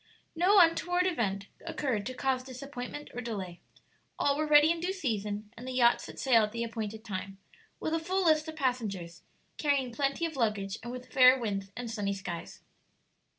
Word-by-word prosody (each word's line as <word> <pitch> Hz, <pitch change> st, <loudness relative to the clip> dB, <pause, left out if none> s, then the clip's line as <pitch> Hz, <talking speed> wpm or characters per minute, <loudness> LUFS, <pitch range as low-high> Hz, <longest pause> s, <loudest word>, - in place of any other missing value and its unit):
No 365 Hz, +5 st, +4 dB
untoward 355 Hz, +1 st, +4 dB
event 205 Hz, -, -1 dB, 0.2 s
occurred 240 Hz, -8 st, -2 dB
to 255 Hz, -, -5 dB
cause 260 Hz, 0 st, 0 dB
disappointment 260 Hz, +2 st, -7 dB
or 245 Hz, -, -4 dB
delay; 195 Hz, -7 st, -5 dB, 0.6 s
all 280 Hz, -, +2 dB
were 305 Hz, +1 st, -1 dB
ready 300 Hz, +1 st, +7 dB
in 335 Hz, -, -1 dB
due 360 Hz, +3 st, -1 dB
season, 210 Hz, -, -3 dB
and 245 Hz, +3 st, -9 dB
the 260 Hz, -, -4 dB
yacht 240 Hz, -1 st, +4 dB
set -, -, -10 dB
sail 245 Hz, -4 st, +4 dB
at 210 Hz, 0 st, 0 dB
the 235 Hz, +1 st, -2 dB
appointed 220 Hz, -1 st, -5 dB
time, 195 Hz, -1 st, -5 dB, 0.4 s
with 315 Hz, -, -2 dB
a 325 Hz, -, +2 dB
full 370 Hz, +3 st, -1 dB
list 310 Hz, -1 st, +4 dB
of 315 Hz, -, -6 dB
passengers, 210 Hz, -, -2 dB, 0.4 s
carrying 275 Hz, -5 st, +1 dB
plenty 275 Hz, +5 st, 0 dB
of 320 Hz, -2 st, -4 dB
luggage, 210 Hz, -5 st, -1 dB
and 240 Hz, +2 st, -6 dB
with 250 Hz, 0 st, -9 dB
fair 255 Hz, 0 st, +8 dB
winds 195 Hz, -4 st, -3 dB
and 240 Hz, -2 st, -4 dB
sunny 200 Hz, -3 st, -1 dB
skies. 185 Hz, -3 st, -7 dB
250 Hz, 185 wpm, -30 LUFS, 210-295 Hz, 0.6 s, fair